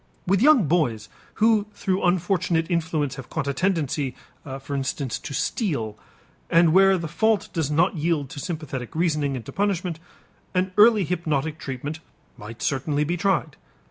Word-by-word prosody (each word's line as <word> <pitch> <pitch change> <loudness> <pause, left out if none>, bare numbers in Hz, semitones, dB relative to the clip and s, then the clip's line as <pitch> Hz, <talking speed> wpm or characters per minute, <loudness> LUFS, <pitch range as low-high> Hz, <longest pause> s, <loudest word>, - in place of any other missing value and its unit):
With 195 +2 +2
young 275 - +6
boys 120 -10 0 0.3
who 215 -1 +3
through 190 -1 -1
unfortunate 175 -1 +1
influence 160 -5 -1
have 135 - -9
caught 155 -4 -3
a 140 - 0
tendency, 150 -6 -1 0.4
for 140 +1 -5
instance, 135 -1 -2
to - - -8
steal, 140 - -1 0.5
and 165 -1 +5
where 195 +1 +6
the 170 -2 -4
fault 220 +6 +1
does 160 -5 -1
not 165 +5 +2
yield 155 -2 0
to 155 - -7
sympathetic 145 -6 -5
reasoning 150 -4 0
and 120 -4 -6
to - - -8
punishment, 185 -4 -1 0.6
an 185 +1 +1
early 210 0 +6
hypnotic 160 -3 -2
treatment 140 +4 -5 0.4
might 115 +2 -9
certainly 145 +2 0
be 170 +4 -1
tried. 180 -6 0
160 Hz, 155 wpm, -24 LUFS, 140-185 Hz, 0.6 s, young